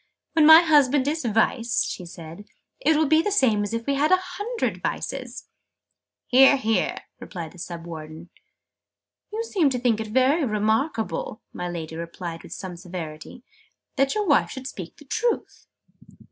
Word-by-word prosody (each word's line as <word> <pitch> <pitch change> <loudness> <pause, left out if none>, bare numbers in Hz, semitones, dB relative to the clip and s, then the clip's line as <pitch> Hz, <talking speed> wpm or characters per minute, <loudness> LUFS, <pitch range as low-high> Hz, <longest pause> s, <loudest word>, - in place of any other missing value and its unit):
"When 315 -2 +5
my 320 +1 +10
husband 290 -4 +3
is 310 +1 -1
Vice," 230 +1 +1
she 180 - -6
said, 170 +3 -10 0.3
"it 320 -11 +3
will 315 - +3
be 315 +2 +4
the 415 - -1
same 245 - +3
as 205 - -3
if 230 0 -3
we 280 - 0
had 290 +4 +1
a 370 - +7
hundred 410 +6 -4
Vices!" - - -4 0.8
"Hear, 270 +2 +6
hear!" 220 -6 0 0.3
cried 170 -5 -6
the 180 - -15
Sub 170 -1 -7
Warden. 160 0 -9 1.0
"You 445 +2 -2
seem 370 -10 +1
to 260 - -2
think 240 -3 +1
it 220 - -5
very 260 +8 +2
remarkable," 225 - -1
my 180 0 -4
Lady 160 -2 -6
remarked 170 0 -6
with - - -14
some 185 -2 -6
severity, 170 +4 -8 0.5
"that 275 +3 +1
your 420 -1 0
wife 290 -6 +3
should 265 -1 -8
speak 185 -10 -8
the 295 - -16
truth!" 465 - -2
245 Hz, 165 wpm, -24 LUFS, -, 1.0 s, my